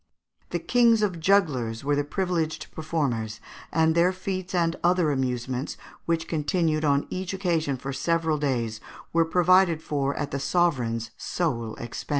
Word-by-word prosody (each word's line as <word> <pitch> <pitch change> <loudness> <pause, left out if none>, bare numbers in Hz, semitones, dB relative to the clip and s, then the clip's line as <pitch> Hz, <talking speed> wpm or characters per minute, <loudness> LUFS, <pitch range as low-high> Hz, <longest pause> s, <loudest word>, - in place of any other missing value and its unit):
The - - -1
kings 235 -3 +3
of 185 -5 0
jugglers 145 - +2
were 145 +1 +1
the 145 - +1
privileged 165 0 -2
performers, 135 -9 -2 0.3
and 160 0 +3
their 170 +2 +4
feats 185 0 -4
and 165 -1 +2
the - - -11
other 175 -3 +3
amusements, 130 0 -2 0.3
which 165 -1 0
continued 160 0 0
on 140 -1 +2
each 185 +1 -3
occasion 165 -7 0
for 135 +2 -5
several 165 0 0
days, 120 -6 -1 0.3
were 165 0 +4
provided 175 -1 +4
for 140 -1 -1
at 145 - -3
the 140 - -2
sovereign's 125 -9 0
sole 115 -11 -2
expense. 120 0 -7
160 Hz, 150 wpm, -26 LUFS, 135-175 Hz, 0.3 s, their